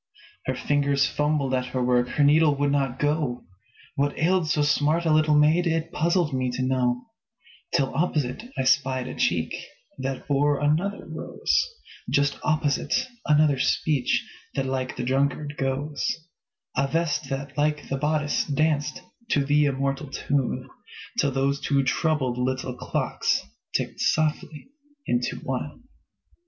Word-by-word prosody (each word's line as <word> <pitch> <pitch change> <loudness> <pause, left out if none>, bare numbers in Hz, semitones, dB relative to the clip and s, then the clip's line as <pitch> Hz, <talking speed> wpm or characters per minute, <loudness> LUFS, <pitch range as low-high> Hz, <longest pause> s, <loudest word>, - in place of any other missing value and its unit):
Her 130 - 0
fingers 140 +1 +2
fumbled 150 -3 0
at 125 -1 0
her 125 0 -2
work, 125 0 +3
Her 145 - +1
needle 150 +1 +5
would 140 0 +1
not 135 -3 0
go; 145 -4 -1 0.5
What 140 +1 0
ailed 175 0 +2
so 150 -1 +2
smart 150 +3 +2
a 160 - +3
little 155 -1 +4
maid 155 +4 +4
It 165 -1 -1
puzzled 170 -1 +1
me 130 -1 0
to 130 - -2
know, 125 -1 0 0.7
Till 135 -1 +1
opposite 150 -4 0 0.2
I - - +1
spied 130 -1 +2
a 130 - -5
cheek 85 -2 0 0.5
That 130 0 -4
bore 145 0 +2
another 160 +8 0
rose; - - -2 0.5
Just 140 0 +1
opposite, 155 - 0 0.2
another 150 -3 +4
speech 140 -1 +1 0.3
That 135 - 0
like 130 -1 -2
the 125 - -2
drunkard 140 +3 0
goes; 140 +2 -2 0.7
A 135 +1 +2
vest 150 -2 -1
that, 135 0 -4
like 150 0 0
the 135 - -2
bodice, 150 +1 +1
danced 150 +1 0 0.3
To 140 -2 +2
the 145 +1 +4
immortal 135 +1 -1
tune, 140 -2 -1 0.5
Till 140 - +3
those 135 +1 0
two 140 -1 +2
troubled 135 -3 0
little 130 0 -1
clocks - - -1 0.3
Ticked - - -5
softly 155 - 0 0.4
into 120 0 0
one. 135 - -4
140 Hz, 145 wpm, -25 LUFS, 130-150 Hz, 0.7 s, needle